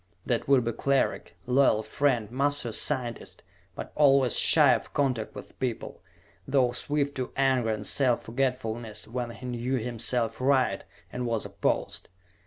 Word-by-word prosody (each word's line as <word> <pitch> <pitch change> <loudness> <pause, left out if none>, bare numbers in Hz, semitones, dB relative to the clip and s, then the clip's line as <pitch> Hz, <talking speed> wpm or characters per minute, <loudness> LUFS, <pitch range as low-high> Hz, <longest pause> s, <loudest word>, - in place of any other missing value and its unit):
That 120 -2 -1
would 135 -3 +4
be 115 - 0
Cleric, 135 -6 -1
loyal 125 -4 +3
friend, 115 -1 0
master 140 -1 0
scientist, 120 -1 -2 0.3
but - - -7
always 135 -4 +4
shy - - +6
of - - -4
contact 130 -6 -1
with - - -11
people, 125 -4 -4 0.5
though 130 -3 +2
swift 145 +2 -2
to 130 -1 -3
anger 130 -4 +2
and 105 -1 -3
self 130 -4 +1
forgetfulness 115 -3 -3
when 120 +1 -4
he 120 +2 -10
knew 125 +1 -2
himself 120 0 -2
right 130 -7 +2 0.3
and 125 0 -3
was 115 -2 -2
opposed. - - -2
125 Hz, 145 wpm, -27 LUFS, 115-135 Hz, 0.5 s, shy